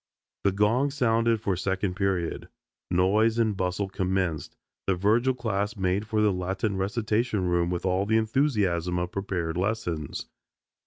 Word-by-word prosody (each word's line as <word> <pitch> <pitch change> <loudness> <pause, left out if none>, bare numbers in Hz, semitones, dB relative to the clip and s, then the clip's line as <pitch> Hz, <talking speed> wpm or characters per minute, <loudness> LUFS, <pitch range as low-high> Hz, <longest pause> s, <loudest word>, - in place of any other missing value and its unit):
The 100 - +3
gong 110 +8 +2
sounded 115 -4 +2
for 100 -4 0
second 95 +1 -1
period; 95 -4 -1 0.4
noise 105 +6 +3
and 110 -3 +2
bustle 95 +1 -1
commenced, 95 -4 -2 0.3
the 95 - +3
Virgil 115 +8 +2
class 110 -2 -2
made 95 +2 0
for 110 -1 +1
the 105 -2 +3
Latin 95 +3 -2
recitation 110 +1 0
room 85 -1 +1
with 90 +1 -3
all 95 +2 +1
the 110 +1 +3
enthusiasm 105 - +1
of 90 0 -2
prepared 90 -4 -2
lessons. 90 -7 -2
100 Hz, 145 wpm, -27 LUFS, 90-110 Hz, 0.4 s, The